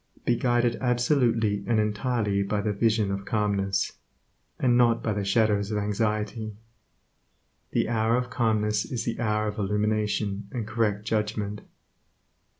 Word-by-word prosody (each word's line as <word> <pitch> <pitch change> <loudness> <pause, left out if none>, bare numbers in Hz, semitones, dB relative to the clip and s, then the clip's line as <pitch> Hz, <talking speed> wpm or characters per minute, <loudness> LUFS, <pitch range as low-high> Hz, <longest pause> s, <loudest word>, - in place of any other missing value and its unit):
Be 120 - +3
guided 120 -1 +1
absolutely 120 -5 +1
and 115 -2 +2
entirely 105 -1 0
by 100 +1 -1
the 105 0 -1
vision 110 -1 +1
of 100 0 -3
calmness, 100 -2 -1 0.6
and 125 -2 +3
not 120 -1 +3
by 110 - 0
the 105 -1 -2
shadows 100 0 +2
of 105 - -1
anxiety. 105 +1 -1 1.1
The - - 0
hour 115 +1 +2
of 125 -1 -3
calmness 105 -2 +1
is 120 -3 -4
the 115 -1 -3
hour 105 -2 0
of 105 +1 -4
illumination 105 0 0
and 115 -4 -3
correct 105 -2 -1
judgment. 105 -1 -2
105 Hz, 140 wpm, -26 LUFS, 105-115 Hz, 1.1 s, Be